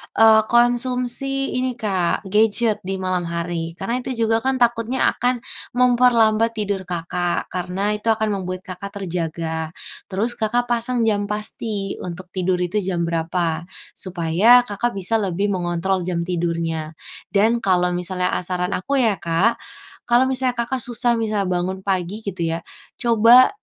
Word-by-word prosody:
eee, 220 -1 +7
konsumsi 250 +2 +1
ini, 255 -1 -1
Kak, 195 -6 -1
gadget 215 +2 +4
di 195 - -1
malam 185 -2 -2
hari. 170 -1 -4
Karena 230 +7 -2
itu 255 0 -4
juga 225 0 +2
kan 265 +3 0
takutnya 240 +1 +1
akan 245 -1 -1 0.3
memperlambat 235 -3 +3
tidur 200 -3 -3
Kakak, 175 0 -2
karena 185 +3 -2
itu 210 +2 -4
akan 220 -1 +2
membuat 185 -2 -4
Kakak 200 +1 -7
terjaga. 165 -2 -3 0.3
Terus 205 +5 -1
Kakak 240 +2 0
pasang 240 0 +1
jam 205 -2 +1
pasti 210 -1 -3
untuk 180 +1 -8
tidur 185 -1 0
itu 180 +4 -1
jam 180 -3 -2
berapa 170 0 -2 0.2
supaya 185 +7 +3
Kakak 235 0 -3
bisa 195 +3 0
lebih 200 -1 -1
mengontrol 180 0 -1
jam 175 -2 -1
tidurnya. 165 -2 -2 0.4
Dan 220 +4 +3
kalau 180 -5 +1
misalnya 180 +1 0
ah 180 - -2
saran 180 0 -1
aku 270 +8 0
ya, 220 -5 +2
Kak, 175 +8 +1 0.5
kalau 245 +2 +3
misalnya 260 -1 +2
Kakak 240 +2 -2
susah 240 -1 +1
misalnya 210 -4 -1
bangun 185 +1 -2
pagi 190 +2 -2
gitu 200 -3 -6 0.2
ya, 165 - -4 0.4
coba, 235 +2 +6
200 Hz, 145 wpm, -21 LUFS, 180-235 Hz, 0.5 s, eee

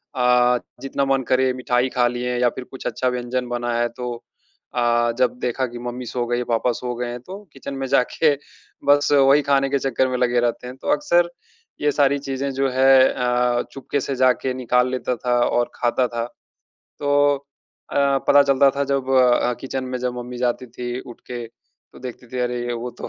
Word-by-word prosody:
अ, 125 0 +4 0.2
जितना 135 0 -1
मन 130 - -2
करें 130 0 +3
मिठाई 125 0 0
खा 120 - +5
लिए 125 0 -2
या 125 0 +4
फिर 130 - -8
कुछ 130 - -6
अच्छा 130 - -1
व्यंजन 125 0 -3
बना 120 0 -2
है, 120 - +2
तो 125 0 -5 0.6
अ, 120 -1 +2
जब 125 -1 +1
देखा 125 +2 -1
कि 120 0 -9
मम्मी 125 +1 -5
सो 120 +1 -2
गईं, 120 +1 0
पापा 120 +1 +1
सो 125 +1 -4
गए 120 +1 -3
हैं 120 - -6
तो 185 +10 -9 0.2
किचन 140 +1 -7
में 135 0 -3
जाके 145 +5 +2 0.5
बस 145 +1 +4
वही 140 +1 +5
खाने 135 -1 +2
के 140 0 +1
चक्कर 130 -1 +1
में 130 -1 -2
लगे 125 -1 +2
रहते 120 +1 -1
हैं। 125 - -8
तो - - -9
अक्सर 170 +4 +2 0.5
ये 150 - +3
सारी 140 0 +3
चीज़ें 135 0 -3
जो 135 0 0
है 130 +1 +2 0.3
अ, 125 -1 +1
चुपके 140 +1 -3
से 135 +1 -3
जाके 130 0 +2
निकाल 125 0 +1
लेता 125 -1 -1
था 120 +1 0
और 120 0 0
खाता 125 +1 +1
था। 115 -1 -3 0.7
तो 145 0 +3 0.6
अ, - - -4 0.3
पता 145 0 +7
चलता 140 0 +4
था 140 - +1
जब 135 -1 0 0.6
किचन 130 0 -4
में 125 0 -4
जब 125 0 -2
मम्मी 125 0 -7
जाती 125 0 -1
थी 120 +1 -5
उठ 120 - -12
के 120 -1 -5 0.5
तो - - -14
देखती 125 0 -8
थी 125 - -6
अरे! 120 0 -1
वो 120 +1 -4
तो - - -5
125 Hz, 200 wpm, -22 LUFS, 120-135 Hz, 0.7 s, पता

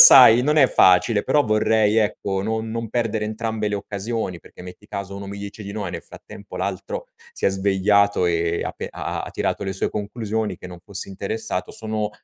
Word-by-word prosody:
sai, 125 -3 +11
non 150 +2 +2
è 135 -4 +6
facile, 100 +4 +4
però 150 - +3
vorrei, 110 0 +2
ecco, 100 -3 0
non 110 +1 -2
non 115 0 -3
perdere 115 -1 -1
entrambe 110 0 -3
le 105 - -1
occasioni, 100 -1 -3
perché 85 - -15
metti 90 +3 -11
caso 100 -2 -6
uno 100 0 -7
mi 100 +1 -7
dice 100 +1 -8
di 100 - -6
no 105 -1 -4
e - - -3
nel - - -6
frattempo 100 -2 -11
l'altro 95 0 -4 0.3
si - - -6
è - - +6
svegliato 100 0 +2
e 85 0 0
ha - - -2
pe - - -7
ha - - -5
ha - - -3
ha - - -8
tirato - - -2
le 95 - -2
sue 95 - -2
conclusioni, 105 +1 -3
che 90 - -10
non 90 -1 -10
fosse 100 -1 -6
interessato 100 0 -4
sono 110 -1 -3
105 Hz, 210 wpm, -22 LUFS, 95-110 Hz, 0.3 s, sai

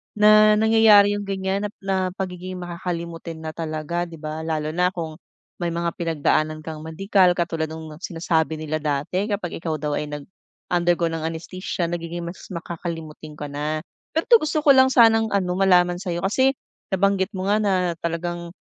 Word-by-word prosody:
Na 215 0 +6
nangyayari 220 -2 +6
'yong 205 -1 -3
ganiyan 195 +1 -1
nap 205 - -16
na 195 -1 0 0.2
pagiging 185 -1 -5
makakalimutin 170 -2 -5
na 155 - -4
talaga, 165 +2 -3
'di 165 - -10
ba, 155 0 -6
lalo 155 -1 -2
na 180 +2 +2
kung 160 -1 -5 0.4
may 175 - -1
mga 170 0 -1
pinagdaanan 155 -1 0
kang 155 -1 -6
medical 180 +3 +2
katulad 165 -2 -1
no'ng 160 -1 -9
sinasabi 165 -3 -1
nila 155 0 -3
dati 155 +7 -1
kapag 200 -6 -3
ikaw 160 -2 -2
daw 150 0 -2
ay 150 - -4
nag 145 -1 -6 0.5
undergo 175 -1 +2
ng 160 0 -2
anestesya, 170 +1 -4
nagiging 170 0 -4
mas 170 +2 -8
makakalimutin 165 -3 -6
ka 145 -1 -7
na. 150 +2 -3 0.3
Pero 320 - +2
'to 470 - +9
gusto 305 0 0
ko 285 - +7
lang 260 -1 +7
sanang, 225 -3 +5
ano, 190 -4 0
malaman 180 -2 +4
sa 190 - -8
'yo 170 0 -2
kasi 260 +7 +2 0.3
nabanggit 195 +1 +1
mo 190 +2 -1
nga 210 - +3
na 205 -2 +1 0.3
talagang 170 +1 -4
175 Hz, 175 wpm, -23 LUFS, 160-195 Hz, 0.5 s, to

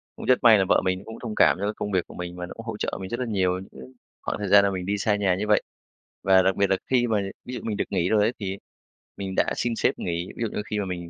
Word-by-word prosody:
Cũng - - -8
rất 130 - +4
may 115 -2 +8
là 95 - +2
vợ - - +4
mình 95 0 0
cũng 110 0 -9
thông 110 -3 -5
cảm - - +5
cho 100 - -1
cái 105 - -1
công 105 - -4
việc 95 -3 0
của - - -12
mình 90 0 -6
và 90 - -4
nó - - -9
cũng 115 - -10
hỗ 110 -2 -5
trợ - - -3
mình 95 - -6
rất 120 - -3
là 125 - -1
nhiều 95 -5 0
những 65 -1 -12 0.3
khoảng - - -3
thời 105 - -3
gian 100 +1 +7
là 100 - +1
mình 90 -1 -4
đi 100 +2 -1
xa 105 +1 +1
nhà 100 -3 +1
như 105 +3 -3
vậy. 105 - +4 0.6
Và 95 -1 +6
đặc 95 0 +2
biệt 100 -1 +2
là 95 - +3
khi 120 -2 +3
mà 110 -2 +1 0.3
ví 125 - -7
dụ - - -4
mình 110 -2 -3
được - - 0
nghỉ 90 -2 +1
rồi 110 -1 +3
ấy, 115 +4 +1
thì 95 -2 -4 0.6
mình 95 -1 -5
đã - - +2
xin 120 -1 -1
sếp - - 0
nghỉ, 85 +1 -3
ví - - -7
dụ - - +1
như - - 0
khi 105 - 0
mà 100 - -1
mình 85 -2 -5
100 Hz, 325 wpm, -25 LUFS, 95-110 Hz, 0.6 s, may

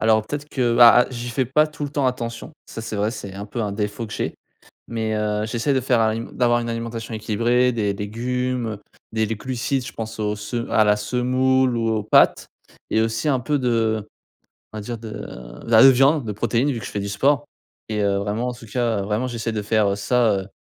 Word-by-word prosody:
Alors, 110 -1 +3
peut-être 145 +2 -5
que, 120 -5 0
bah, 120 0 +8
ah - - -9
j'y 120 -1 -5
fais 130 +2 0
pas 150 +5 +3
tout 150 -1 -6
le 145 - -4
temps 140 -2 0
attention, 120 +2 -4
ça, - - -7
c'est 110 -1 -5
vrai, 105 +2 +1
c'est 100 -4 -7
un 100 +1 -6
peu 115 +3 -5
un 105 -2 -1
défaut 105 +2 -3
que - - -10
j'ai. - - -3 0.5
Mais 110 -1 -2
heu, 105 0 -1
j'essaie 120 +5 0
de 130 - +2
faire 125 -2 +2
à 110 -1 +2
une 115 +1 -5
d'avoir 120 -1 +3
une 120 0 -3
alimentation 115 0 -5
équilibrée, 120 +4 +1
des 105 -4 0
légumes, 125 +4 -2
heu, 105 -2 -5 0.3
des 110 -1 +1
les 110 +1 -3
glucides, 130 +3 -2
je - - -7
pense 110 0 -6
aux 105 0 -1
se 105 +3 -4
à 110 - +4
la 105 0 +4
semoule 125 +3 +1
ou 115 -1 0
aux 110 -1 0
pâtes, - - +4 0.4
et 110 - +2
aussi 115 +6 -1
un 135 -3 +2
peu 145 +5 0
de 115 -4 0 0.7
on - - -6
va 105 - -4
dire 120 +3 -5
de 110 -1 -9
de 60 - -9
la 115 +4 +9
viande, 135 +2 +3
des 105 - -3
protéines, 120 +6 0
vu 120 - -3
que 105 - -8
je - - -7
fais 105 - -3
du 100 - -4
sport 140 +8 +2 0.4
et 105 -1 -1
heu, 100 -1 +2
vraiment 105 +5 -2
en - - -4
tout 120 -1 -13
cas 115 -2 0
vraiment, 105 +5 -1
j'essaie 115 -2 -3
de 105 - -2
faire, 105 0 +2
heu, 100 - 0
ça, 115 +2 +2
heu, 95 - -7
115 Hz, 240 wpm, -22 LUFS, 105-125 Hz, 0.7 s, la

